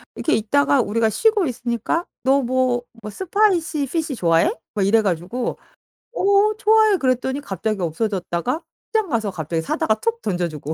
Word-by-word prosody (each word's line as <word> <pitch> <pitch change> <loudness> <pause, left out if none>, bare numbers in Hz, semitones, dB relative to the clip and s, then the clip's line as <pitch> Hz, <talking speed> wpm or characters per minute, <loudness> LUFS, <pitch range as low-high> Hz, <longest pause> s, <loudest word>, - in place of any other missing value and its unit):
이렇게 320 - +1
있다가 280 +5 +2
우리가 225 0 +1
쉬고 420 - +2
있으니까 245 +5 -2 0.2
"너 270 +1 +3
뭐 255 -1 +1 0.2
뭐 210 - -5
spicy 360 - +1
fish 305 +1 -2
좋아해?" 170 - +3 0.3
이래 205 +4 +4
가지고 195 +5 -2 0.6
"어 405 0 +3
좋아해." 435 -2 +4
그랬더니 265 -1 0
갑자기 210 -3 -3
없어졌다가 185 - -2 0.3
시장 440 -4 0
가서 220 -6 -1
갑자기 160 -1 -3
사다가 215 +6 0
툭 460 - -2
던져주고. 165 -5 -3
250 Hz, 370 characters per minute, -21 LUFS, 200-335 Hz, 0.6 s, 이래